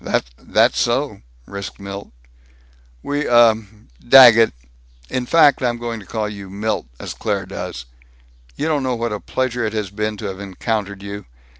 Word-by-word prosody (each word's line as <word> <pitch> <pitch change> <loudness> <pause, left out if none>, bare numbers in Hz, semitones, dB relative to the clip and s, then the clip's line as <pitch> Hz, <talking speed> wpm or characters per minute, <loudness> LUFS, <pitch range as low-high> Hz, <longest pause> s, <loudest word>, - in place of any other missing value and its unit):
"That's - - +2
so," - - 0 0.2
risked 100 -1 -7
Milt. 100 0 -8 0.9
"We, 145 +1 -2
uh 120 -2 +6 0.6
Daggett 115 -4 +9 0.6
In 125 -1 -2
fact, 150 -3 +5
I'm 120 -2 0
going 120 -1 -5
to 100 - -14
call 110 -2 -2
you 100 -2 -8
Milt, 105 - -3
as - - -6
Claire 100 -3 -2
does. 60 -9 -6 0.7
You - - -3
don't 150 -3 +1
know 130 -1 -1
what 115 -1 -2
a 105 - -4
pleasure 125 0 -2
it 110 -1 -2
has 105 -4 -3
been 105 +1 -3
to 105 - -7
have 95 -1 -5
encountered 100 0 -4
you. 100 -3 -7
110 Hz, 160 wpm, -20 LUFS, 100-120 Hz, 0.9 s, Daggett